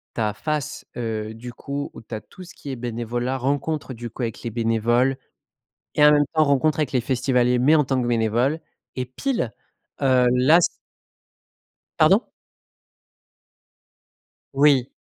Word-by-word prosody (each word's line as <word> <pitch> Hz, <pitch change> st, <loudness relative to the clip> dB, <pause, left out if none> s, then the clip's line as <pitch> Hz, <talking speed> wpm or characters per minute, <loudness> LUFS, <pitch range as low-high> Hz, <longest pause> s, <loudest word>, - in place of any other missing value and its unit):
Tu -, -, -2 dB
as 105 Hz, -1 st, 0 dB
face, 150 Hz, +5 st, -3 dB
heu, 110 Hz, -2 st, -3 dB
du 120 Hz, +2 st, -9 dB
coup 140 Hz, +3 st, -5 dB
où -, -, -10 dB
tu 115 Hz, -, -12 dB
as 110 Hz, -, -2 dB
tout 185 Hz, -, -14 dB
ce 180 Hz, 0 st, -13 dB
qui 145 Hz, -, -10 dB
est 135 Hz, -, -3 dB
bénévolat, 120 Hz, +2 st, -3 dB
rencontre, 140 Hz, +2 st, -2 dB
du 120 Hz, 0 st, -7 dB
coup 120 Hz, +3 st, -6 dB
avec 115 Hz, -2 st, -4 dB
les 120 Hz, -, -3 dB
bénévoles 120 Hz, +3 st, +1 dB, 0.8 s
et 150 Hz, -, +3 dB
en 150 Hz, -, +8 dB
même 145 Hz, 0 st, +4 dB
temps, 155 Hz, -1 st, +4 dB
rencontre 145 Hz, +2 st, +2 dB
avec 150 Hz, -4 st, 0 dB
les 130 Hz, -3 st, +1 dB
festivaliers, 125 Hz, -1 st, +1 dB
mais 145 Hz, +6 st, +5 dB
en 150 Hz, -, +4 dB
tant 130 Hz, -1 st, 0 dB
que 120 Hz, -, -2 dB
bénévole 120 Hz, +6 st, +1 dB, 0.4 s
et 130 Hz, -, -2 dB
pile, 130 Hz, -, -2 dB, 0.5 s
heu, 130 Hz, -2 st, +4 dB
là 135 Hz, +7 st, +5 dB
c -, -, +3 dB, 1.3 s
Pardon? 190 Hz, +9 st, +5 dB, 2.3 s
Oui. 140 Hz, -2 st, +4 dB
130 Hz, 160 wpm, -23 LUFS, 120-145 Hz, 2.3 s, en